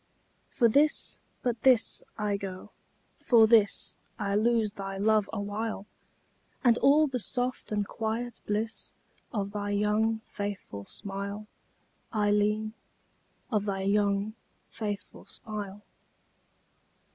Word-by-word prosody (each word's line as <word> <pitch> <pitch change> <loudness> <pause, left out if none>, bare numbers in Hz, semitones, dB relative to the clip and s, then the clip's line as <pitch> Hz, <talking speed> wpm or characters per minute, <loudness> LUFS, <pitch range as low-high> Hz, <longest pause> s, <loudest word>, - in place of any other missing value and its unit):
For 240 - +4
this, 290 +7 +2 0.2
but 240 -2 -1
this, 255 -4 +4 0.2
I 210 -2 0
go 195 0 -6 0.5
for 230 -3 +6
this 220 -2 +4 0.2
I 200 -3 -1
lose 220 0 +2
thy 195 -1 -5
love 210 0 +3
awhile; 205 0 -3 0.8
And 240 -3 +5
all 295 +3 +6
the 260 -4 -2
soft 245 +2 -1
and 205 -1 0
quiet 230 +2 -3
bliss 215 +2 -2 0.4
Of 200 -4 -2
thy 205 -1 -3
young, 210 +2 +2
faithful 200 - -5
smile, 200 - -5 0.7
Ailleen, 210 0 +2 0.8
Of 210 -3 +1
thy 195 -2 -1
young, 200 +1 +2 0.4
faithful 205 -3 -5
smile. 210 -2 -6
210 Hz, 110 wpm, -29 LUFS, 200-225 Hz, 0.8 s, for